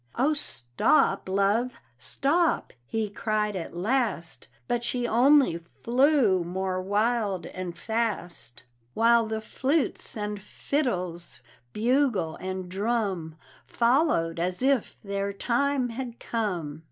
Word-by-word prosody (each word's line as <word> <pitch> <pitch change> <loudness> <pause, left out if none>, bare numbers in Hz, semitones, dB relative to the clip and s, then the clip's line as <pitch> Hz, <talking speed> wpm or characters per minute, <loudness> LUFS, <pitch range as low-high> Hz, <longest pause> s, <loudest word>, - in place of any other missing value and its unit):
"Oh, 280 +5 +2
stop, 150 - +1
love, 205 +6 +1 0.2
stop!" 315 - +1
he 220 +4 -1
cried 210 0 -1
at 170 -1 -5
last; 210 -4 -1 0.2
But 240 -1 0
she 245 0 -1
only 250 - +4
flew 235 - +2
more 185 +1 -2
wild 205 -2 0
and 180 -2 -6
fast, 190 - -3 0.3
While 230 0 +4
the 220 0 -3
flutes 265 +1 -1
and 210 -1 -3
fiddles, 185 - -2 0.3
bugle 230 - +1
and 185 0 -5
drum, 195 -5 -1 0.3
Followed 235 - +2
as 180 +6 0
if 270 -4 +1
their 200 0 -2
time 255 +5 0
had 240 0 -6
come. 175 -10 -3
215 Hz, 110 wpm, -27 LUFS, 185-245 Hz, 0.3 s, only